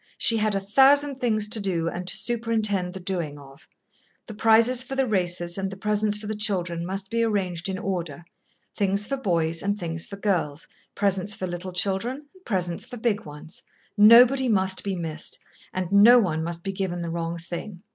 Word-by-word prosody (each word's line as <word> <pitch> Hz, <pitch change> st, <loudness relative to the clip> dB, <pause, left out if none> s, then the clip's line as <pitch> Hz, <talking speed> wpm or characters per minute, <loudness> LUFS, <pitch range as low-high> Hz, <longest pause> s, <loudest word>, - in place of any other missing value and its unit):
She 230 Hz, -, +3 dB
had 215 Hz, -1 st, 0 dB
a -, -, +1 dB
thousand 270 Hz, +7 st, +4 dB
things 215 Hz, -4 st, +1 dB
to 220 Hz, 0 st, 0 dB
do 180 Hz, -5 st, -2 dB
and 180 Hz, +2 st, -5 dB
to 195 Hz, -, +3 dB
superintend 215 Hz, -4 st, 0 dB
the -, -, -6 dB
doing 175 Hz, -5 st, -3 dB
of. 140 Hz, +1 st, -16 dB, 0.6 s
The 220 Hz, -, -9 dB
prizes 225 Hz, +4 st, +3 dB
for 265 Hz, +1 st, -3 dB
the 270 Hz, 0 st, +1 dB
races 175 Hz, -4 st, -1 dB
and 195 Hz, 0 st, -2 dB
the 195 Hz, -, -9 dB
presents 210 Hz, +1 st, +1 dB
for 210 Hz, -, -9 dB
the 215 Hz, -, -3 dB
children 180 Hz, -5 st, -1 dB
must 195 Hz, +2 st, -4 dB
be 230 Hz, 0 st, +1 dB
arranged 190 Hz, -5 st, -1 dB
in 190 Hz, -, -3 dB
order: 170 Hz, -5 st, -4 dB, 0.5 s
things 200 Hz, 0 st, 0 dB
for 275 Hz, -, -2 dB
boys 165 Hz, -9 st, -1 dB
and 200 Hz, +1 st, -1 dB
things 165 Hz, -2 st, -4 dB
for 200 Hz, -, -9 dB
girls, 170 Hz, -7 st, -2 dB, 0.3 s
presents 200 Hz, 0 st, 0 dB
for 185 Hz, -, -4 dB
little 175 Hz, +1 st, -6 dB
children 205 Hz, +10 st, -1 dB
and 375 Hz, -, -22 dB
presents 180 Hz, -5 st, -2 dB
for 245 Hz, -, -7 dB
big 220 Hz, -2 st, -1 dB
ones. 150 Hz, +2 st, -10 dB, 0.3 s
Nobody 240 Hz, +5 st, +6 dB
must 190 Hz, -3 st, +2 dB
be 195 Hz, -1 st, -2 dB
missed, 160 Hz, -3 st, -4 dB, 0.3 s
and 185 Hz, -1 st, -4 dB
no 210 Hz, +5 st, +7 dB
one 165 Hz, -8 st, 0 dB
must 170 Hz, 0 st, -5 dB
be 195 Hz, -, -3 dB
given 185 Hz, -3 st, -3 dB
the 170 Hz, -, -4 dB
wrong 170 Hz, 0 st, -3 dB
thing. 175 Hz, +3 st, -8 dB
195 Hz, 195 wpm, -24 LUFS, 175-215 Hz, 0.6 s, no